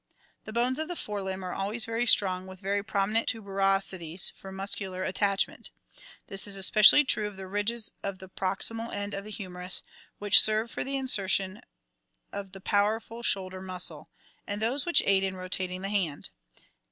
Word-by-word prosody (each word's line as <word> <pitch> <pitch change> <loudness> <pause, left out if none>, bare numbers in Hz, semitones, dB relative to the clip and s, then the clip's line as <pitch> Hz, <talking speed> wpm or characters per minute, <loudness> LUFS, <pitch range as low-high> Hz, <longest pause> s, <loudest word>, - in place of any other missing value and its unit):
The - - -8
bones 245 +4 +1
of 315 - -2
the 355 - -5
fore 210 -9 -5
limb 190 0 -5
are 180 - -4
always 210 +4 -1
very 230 +2 -1
strong, 185 -4 +4
with 190 0 -11
very 200 +1 -1
prominent 210 +2 0
tuberosi 195 -3 0
ties 170 +2 -2
for 195 - -11
muscular 190 -1 -2
at 185 - -3
tachment. 200 -1 -1 0.6
This 195 +1 -3
is 200 - -2
especially 210 +8 +7
true 215 -6 0
of 205 -2 -10
the 190 - -7
ridges 205 +4 -2
at 195 -1 -4
the 190 0 -12
proxi 190 +4 -1
mal 230 +1 -4
end 205 0 -4
of 200 0 -5
the 215 - -9
hu 200 -2 -6
merus, 180 +1 0 0.3
which 205 -1 +7
serve 215 +2 +2
for - - -3
the 275 +1 -3
insertion 195 -6 0 0.7
of 195 -1 -7
the 195 - -10
powerful 220 +4 -1
shoulder 190 -4 -1
muscle, 185 -1 +3 0.4
and 205 0 -4
those 250 +8 0
which 345 - +4
aid 195 -1 +3
in 190 -1 -2
rotating 185 0 -3
the 195 - -3
hand. 180 -8 -2
200 Hz, 190 wpm, -28 LUFS, 190-215 Hz, 0.7 s, especially